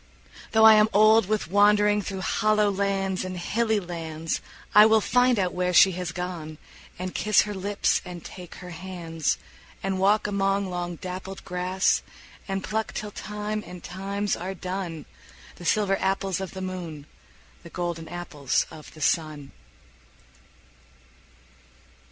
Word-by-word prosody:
Though 220 Hz, 0 st, +6 dB
I 220 Hz, -, +10 dB
am 215 Hz, 0 st, +5 dB
old 215 Hz, 0 st, +6 dB
with 210 Hz, -5 st, -1 dB
wandering 205 Hz, +1 st, +4 dB
Through 195 Hz, -1 st, -5 dB
hollow 215 Hz, +1 st, +2 dB
lands 195 Hz, -1 st, -1 dB
and 185 Hz, 0 st, -5 dB
hilly 220 Hz, +4 st, 0 dB
lands, 165 Hz, -3 st, -4 dB, 0.3 s
I 210 Hz, -, +9 dB
will 220 Hz, 0 st, +5 dB
find 245 Hz, +2 st, +3 dB
out 185 Hz, -3 st, 0 dB
where 180 Hz, 0 st, 0 dB
she 190 Hz, +2 st, +7 dB
has 180 Hz, -1 st, -4 dB
gone, 170 Hz, -3 st, -5 dB, 0.4 s
And 185 Hz, 0 st, -5 dB
kiss 215 Hz, 0 st, +4 dB
her 210 Hz, -, -5 dB
lips 200 Hz, +1 st, 0 dB
and 175 Hz, -2 st, -9 dB
take 180 Hz, -2 st, -10 dB
her 180 Hz, 0 st, -9 dB
hands; 165 Hz, -2 st, -3 dB, 0.5 s
And 190 Hz, -1 st, -1 dB
walk 205 Hz, +3 st, +3 dB
among 195 Hz, -1 st, 0 dB
long 175 Hz, -1 st, -3 dB
dappled 185 Hz, +2 st, -7 dB
grass, 180 Hz, +1 st, +1 dB, 0.5 s
And 195 Hz, -1 st, -2 dB
pluck 220 Hz, +1 st, -2 dB
till 210 Hz, -1 st, -5 dB
time 210 Hz, +1 st, -4 dB
and 180 Hz, -1 st, -10 dB
times 200 Hz, +2 st, -2 dB
are 185 Hz, +3 st, -5 dB
done 180 Hz, -3 st, -5 dB, 0.5 s
The 175 Hz, -, -10 dB
silver 195 Hz, +2 st, +2 dB
apples 195 Hz, -1 st, 0 dB
of 190 Hz, -1 st, -6 dB
the 190 Hz, -, -5 dB
moon, 175 Hz, -6 st, -6 dB, 0.6 s
The 170 Hz, -, -12 dB
golden 170 Hz, -2 st, -4 dB
apples 160 Hz, -6 st, -1 dB
of 155 Hz, -, -11 dB
the 155 Hz, -, -12 dB
sun. 150 Hz, -2 st, 0 dB
190 Hz, 145 wpm, -26 LUFS, 175-205 Hz, 0.6 s, I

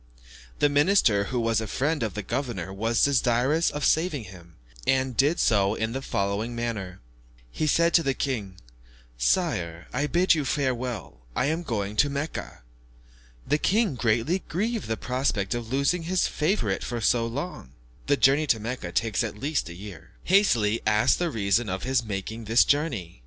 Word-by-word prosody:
The -, -, +4 dB
minister, 145 Hz, -, +3 dB
who 125 Hz, +4 st, -2 dB
was 115 Hz, -1 st, +1 dB
a 110 Hz, -, -4 dB
friend 145 Hz, +7 st, -1 dB
of 110 Hz, -5 st, -2 dB
the 105 Hz, -, -4 dB
governor, 95 Hz, -7 st, -3 dB
was 115 Hz, +4 st, 0 dB
desirous 135 Hz, +3 st, +2 dB
of 145 Hz, 0 st, -3 dB
saving 160 Hz, -5 st, +1 dB
him, 90 Hz, -4 st, -14 dB, 0.3 s
and 130 Hz, -1 st, +1 dB
did 145 Hz, +7 st, +2 dB
so 100 Hz, -2 st, +3 dB
in 110 Hz, 0 st, -2 dB
the 135 Hz, +3 st, -4 dB
following 100 Hz, +1 st, -2 dB
manner. 110 Hz, -6 st, -4 dB, 0.5 s
He 155 Hz, -, -2 dB
said 170 Hz, +2 st, +3 dB
to 170 Hz, -, +6 dB
the 135 Hz, -4 st, -1 dB
king, 110 Hz, -9 st, -3 dB, 0.6 s
"Sire, 80 Hz, +8 st, 0 dB
I 140 Hz, +4 st, 0 dB
bid 175 Hz, +4 st, +3 dB
you 155 Hz, -3 st, 0 dB
farewell, 130 Hz, -, -2 dB, 0.2 s
I -, -, +1 dB
am 165 Hz, -, -3 dB
going 105 Hz, -, -3 dB
to 145 Hz, -, +4 dB
Mecca." 140 Hz, -, -5 dB, 0.8 s
The 150 Hz, -, +1 dB
king, 210 Hz, -1 st, +2 dB
greatly 120 Hz, -, +1 dB
grieved 220 Hz, +6 st, -2 dB
at -, -, -10 dB
the 110 Hz, -, -1 dB
prospect 125 Hz, -5 st, -1 dB
of 120 Hz, -1 st, -5 dB
losing 140 Hz, +6 st, +1 dB
his 180 Hz, +2 st, 0 dB
favourite 150 Hz, -, -1 dB
for 120 Hz, -, -3 dB
so 115 Hz, +1 st, +2 dB
long 125 Hz, -, -6 dB, 0.3 s
(the 145 Hz, 0 st, +3 dB
journey 140 Hz, +4 st, +4 dB
to 115 Hz, -, +2 dB
Mecca 110 Hz, -5 st, -5 dB
takes 110 Hz, +4 st, 0 dB
at 110 Hz, -2 st, -5 dB
least 140 Hz, -, -2 dB
a 85 Hz, -, -9 dB
year), 100 Hz, -2 st, -11 dB
hastily 120 Hz, -, +3 dB
asked 105 Hz, 0 st, +3 dB
the 175 Hz, -1 st, 0 dB
reason 110 Hz, -2 st, 0 dB
of 95 Hz, +1 st, -3 dB
his 130 Hz, -1 st, +1 dB
making 110 Hz, +2 st, -5 dB
this 115 Hz, +3 st, +4 dB
journey. 125 Hz, -, -1 dB
120 Hz, 175 wpm, -26 LUFS, 105-145 Hz, 0.8 s, to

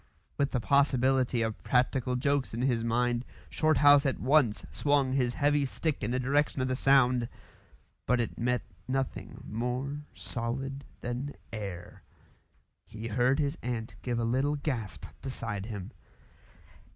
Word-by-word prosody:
With 140 Hz, -1 st, +1 dB
the 125 Hz, -, 0 dB
possibility 130 Hz, -2 st, +3 dB
of 110 Hz, -1 st, -3 dB
practical 125 Hz, 0 st, +1 dB
jokes 140 Hz, -1 st, 0 dB
in 120 Hz, -, -2 dB
his 120 Hz, -4 st, +1 dB
mind, 120 Hz, +1 st, +1 dB, 0.3 s
Shorthouse 145 Hz, -2 st, +5 dB
at 135 Hz, -3 st, 0 dB
once 130 Hz, -5 st, +3 dB
swung 145 Hz, -3 st, +2 dB
his 125 Hz, -3 st, +1 dB
heavy 145 Hz, 0 st, +3 dB
stick 150 Hz, +3 st, -2 dB
in 105 Hz, -, 0 dB
the 125 Hz, +1 st, 0 dB
direction 140 Hz, +3 st, +1 dB
of 130 Hz, -, +1 dB
the 130 Hz, -, 0 dB
sound; 125 Hz, -3 st, +4 dB, 0.8 s
but 125 Hz, 0 st, +3 dB
it 115 Hz, -, -1 dB
met 125 Hz, +1 st, 0 dB, 0.2 s
nothing 135 Hz, 0 st, -3 dB
more 125 Hz, +6 st, -2 dB
solid 120 Hz, +9 st, -3 dB, 0.2 s
than 125 Hz, +4 st, -4 dB, 0.2 s
air. 100 Hz, -5 st, -6 dB, 0.9 s
He 110 Hz, +2 st, -6 dB
heard 125 Hz, +5 st, +2 dB
his 145 Hz, 0 st, -1 dB
aunt 120 Hz, -2 st, -3 dB
give 120 Hz, -2 st, -2 dB
a 115 Hz, -, 0 dB
little 130 Hz, +5 st, +1 dB
gasp 130 Hz, -8 st, -3 dB, 0.2 s
beside 115 Hz, -6 st, -4 dB
him. 105 Hz, -1 st, -6 dB
125 Hz, 140 wpm, -30 LUFS, 115-140 Hz, 0.9 s, Shorthouse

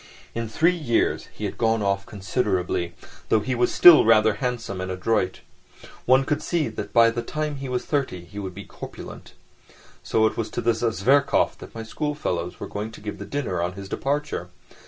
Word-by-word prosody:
In 115 Hz, -1 st, -3 dB
three 165 Hz, +10 st, +3 dB
years 130 Hz, -9 st, 0 dB
he -, -, -6 dB
had -, -, -5 dB
gone 115 Hz, -1 st, +2 dB
off 100 Hz, 0 st, 0 dB
considerably, 95 Hz, -4 st, -1 dB, 0.3 s
though 110 Hz, -, +4 dB
he 125 Hz, +5 st, -2 dB
was 120 Hz, 0 st, +1 dB
still 175 Hz, -3 st, +9 dB
rather 110 Hz, -1 st, +5 dB
handsome 115 Hz, -3 st, -3 dB
and 95 Hz, -, -4 dB
adroit. 95 Hz, 0 st, -1 dB, 0.7 s
One 130 Hz, +2 st, +5 dB
could 150 Hz, +1 st, 0 dB
see 165 Hz, -6 st, 0 dB
that 105 Hz, -2 st, -6 dB
by 115 Hz, -1 st, +6 dB
the 120 Hz, +1 st, -3 dB
time 150 Hz, +4 st, -3 dB
he 135 Hz, -1 st, -6 dB
was 125 Hz, -1 st, -2 dB
thirty 130 Hz, -, -2 dB
he 100 Hz, +4 st, -9 dB
would 95 Hz, -3 st, -6 dB
be 100 Hz, 0 st, -8 dB
corpulent. -, -, -10 dB, 0.7 s
So 110 Hz, -, +2 dB
it 110 Hz, -, 0 dB
was 115 Hz, -, -2 dB
to -, -, +1 dB
this 115 Hz, -1 st, +1 dB
Zverkov 120 Hz, +5 st, +2 dB
that -, -, -12 dB
my 115 Hz, -, -5 dB
schoolfellows 110 Hz, -, -3 dB
were -, -, -4 dB
going 105 Hz, +2 st, -5 dB
to -, -, -11 dB
give 105 Hz, 0 st, -6 dB
a -, -, -5 dB
dinner 120 Hz, -12 st, -2 dB
on 90 Hz, +1 st, -1 dB
his 100 Hz, 0 st, -8 dB
departure. 140 Hz, -5 st, -2 dB
115 Hz, 195 wpm, -24 LUFS, 100-130 Hz, 0.7 s, still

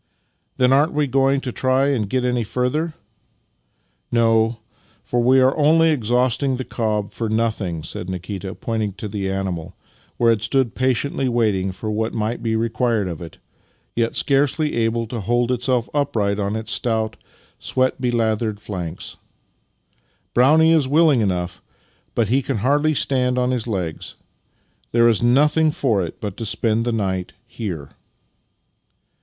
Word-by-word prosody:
" -, -, -46 dB
Then 125 Hz, +1 st, +4 dB
aren't 145 Hz, +4 st, +3 dB
we 150 Hz, 0 st, +1 dB
going 135 Hz, +1 st, +2 dB
to 130 Hz, -, -4 dB
try 130 Hz, +3 st, +1 dB
and 115 Hz, -8 st, -1 dB
get 130 Hz, +1 st, 0 dB
any 125 Hz, -1 st, 0 dB
further? 130 Hz, +9 st, -1 dB, 0.4 s
" -, -, -46 dB
" -, -, -46 dB
No, 115 Hz, -1 st, +3 dB, 0.5 s
for 120 Hz, -, 0 dB
we 130 Hz, +2 st, +5 dB
are 130 Hz, +1 st, +4 dB
only 160 Hz, +2 st, +4 dB
exhausting 125 Hz, +1 st, +1 dB
the 130 Hz, -, -3 dB
cob 105 Hz, -3 st, -2 dB
for 115 Hz, -2 st, -3 dB
nothing," 110 Hz, -7 st, -1 dB
said 90 Hz, +3 st, -6 dB
Nikita, 95 Hz, +1 st, -5 dB
pointing 110 Hz, -3 st, -2 dB
to 105 Hz, +2 st, -6 dB
the 100 Hz, -1 st, -3 dB
animal 95 Hz, -3 st, -4 dB, 0.4 s
where 115 Hz, -1 st, +4 dB
it 110 Hz, -3 st, 0 dB
stood 120 Hz, +1 st, 0 dB
patiently 130 Hz, +1 st, 0 dB
waiting 105 Hz, -6 st, +1 dB
for 110 Hz, +4 st, -5 dB
what 110 Hz, +1 st, -2 dB
might 110 Hz, +2 st, -2 dB
be 110 Hz, -1 st, -1 dB
re 115 Hz, +1 st, +1 dB
quired 115 Hz, -4 st, 0 dB
of 85 Hz, -3 st, -6 dB
it, 85 Hz, -, -9 dB, 0.6 s
yet 115 Hz, -1 st, 0 dB
scarcely 145 Hz, +2 st, +1 dB
able 115 Hz, 0 st, 0 dB
to 115 Hz, 0 st, -5 dB
hold 120 Hz, +4 st, +1 dB
itself 125 Hz, -1 st, 0 dB
upright 105 Hz, -8 st, 0 dB
on 100 Hz, +1 st, -1 dB
its 110 Hz, 0 st, -5 dB
stout, 110 Hz, -2 st, -1 dB, 0.4 s
sweat 130 Hz, 0 st, 0 dB
belathered 115 Hz, -3 st, 0 dB
flanks. 90 Hz, -5 st, -6 dB, 1.2 s
"Brownie 155 Hz, +6 st, +5 dB
is 155 Hz, -5 st, +3 dB
willing 150 Hz, -3 st, +4 dB
enough, 90 Hz, -3 st, -2 dB, 0.5 s
but 115 Hz, -3 st, +2 dB
he 135 Hz, +4 st, +3 dB
can 135 Hz, -2 st, -2 dB
hardly 145 Hz, +3 st, +2 dB
stand 125 Hz, -2 st, +1 dB
on 125 Hz, 0 st, +1 dB
his 120 Hz, -2 st, -2 dB
legs. 90 Hz, -7 st, -4 dB, 0.8 s
There 115 Hz, 0 st, +5 dB
is 115 Hz, -1 st, +3 dB
nothing 150 Hz, +6 st, +4 dB
for 115 Hz, -10 st, 0 dB
it 85 Hz, -, -7 dB
but 105 Hz, -3 st, -5 dB
to 115 Hz, -, -4 dB
spend 115 Hz, +1 st, 0 dB
the 120 Hz, -, 0 dB
night 95 Hz, -5 st, -2 dB
here." 90 Hz, -, -6 dB
115 Hz, 160 wpm, -21 LUFS, 105-130 Hz, 1.2 s, we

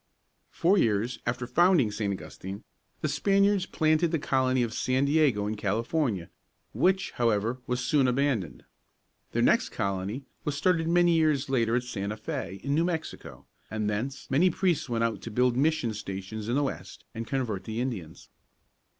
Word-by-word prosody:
Four 185 Hz, +4 st, +2 dB
years 115 Hz, +1 st, +1 dB
after 125 Hz, +1 st, -1 dB
founding 155 Hz, -, +3 dB
St. 105 Hz, -1 st, -2 dB
Augustine, 95 Hz, +1 st, -7 dB, 0.4 s
the -, -, 0 dB
Spaniards 195 Hz, +5 st, +2 dB
planted 155 Hz, +2 st, +2 dB
the 165 Hz, -, +1 dB
colony 130 Hz, -3 st, +1 dB
of 115 Hz, -2 st, -3 dB
San 130 Hz, +4 st, +1 dB
Diego 140 Hz, -8 st, +2 dB
in 105 Hz, -, -1 dB
California, 110 Hz, -, -1 dB, 0.4 s
which, 185 Hz, -, +2 dB
however, 115 Hz, +1 st, 0 dB
was 125 Hz, +1 st, -1 dB
soon 135 Hz, 0 st, +3 dB
abandoned. 125 Hz, -, 0 dB, 0.7 s
Their -, -, +2 dB
next -, -, +3 dB
colony 100 Hz, +6 st, -3 dB, 0.2 s
was 145 Hz, -1 st, -2 dB
started 165 Hz, +1 st, +2 dB
many 175 Hz, 0 st, +4 dB
years 150 Hz, -4 st, +2 dB
later 115 Hz, -3 st, +2 dB
at 125 Hz, -, +1 dB
Santa 105 Hz, -3 st, -4 dB
Fé 105 Hz, -, -27 dB, 0.3 s
(fā´), 95 Hz, -, -10 dB
in 140 Hz, -, -1 dB
New 165 Hz, +3 st, +2 dB
Mexico, 165 Hz, -3 st, -5 dB, 0.2 s
and 110 Hz, -1 st, -2 dB
thence 115 Hz, +7 st, -3 dB
many 165 Hz, +8 st, +4 dB
priests 175 Hz, -5 st, 0 dB
went 115 Hz, -1 st, 0 dB
out 115 Hz, -1 st, -1 dB
to -, -, -6 dB
build 125 Hz, +2 st, +2 dB
mission 145 Hz, -4 st, +1 dB
stations 105 Hz, +1 st, -6 dB
in 120 Hz, -, +1 dB
the 145 Hz, -, +2 dB
West 135 Hz, -, -6 dB
and 115 Hz, -1 st, -5 dB
convert 120 Hz, -8 st, -2 dB
the 110 Hz, 0 st, -4 dB
Indians. 105 Hz, -11 st, -5 dB
125 Hz, 165 wpm, -28 LUFS, 110-155 Hz, 0.7 s, many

